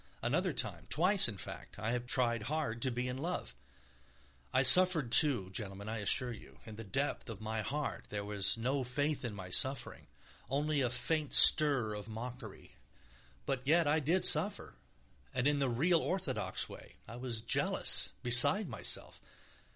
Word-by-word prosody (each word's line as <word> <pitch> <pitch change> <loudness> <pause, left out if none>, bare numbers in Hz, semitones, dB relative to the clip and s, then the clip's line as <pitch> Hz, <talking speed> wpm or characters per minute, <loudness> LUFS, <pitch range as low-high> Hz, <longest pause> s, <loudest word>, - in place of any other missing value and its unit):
Another - - -1
time, - - -5
twice, 180 +3 +2
in 105 - -7
fact, - - -10
I 115 +3 -3
tried 120 -1 -2
hard 145 -7 -4
to 130 - 0
be 125 +1 -4
in 125 +1 -6
love. 165 - -5 1.0
I 130 - +1
suffered, 165 -3 +6
too, 120 -13 +3
gentlemen, 100 0 -6
I 110 +1 -5
assure 125 +5 0
you. 115 - -14
In 110 -2 -11
the 115 - -9
depth 135 +6 -4
of 110 -3 -9
my 110 0 -5
heart 145 +5 -6
there 100 -1 -6
was 100 0 -2
no 130 +4 -3
faith 145 +4 -3
in 115 -4 -6
my 95 -2 -10
suffering, 130 +6 -2 0.4
only 145 +2 -2
a 125 - -1
faint 155 +4 -3
stir 140 -8 +7
of 105 +1 -9
mockery, 115 - -10 0.7
but 135 -2 -3
yet 165 +5 +1
I 150 +2 +1
did 165 +6 0
suffer, 190 - +2 0.6
and 125 -1 -2
in 145 -1 0
the 135 -2 -1
real, 165 +9 +1
orthodox 155 - -4
way; - - -14
I 115 - -10
was 120 -3 -5
jealous, - - +1
beside 140 - +6
myself - - -4
125 Hz, 165 wpm, -32 LUFS, 110-150 Hz, 1.0 s, stir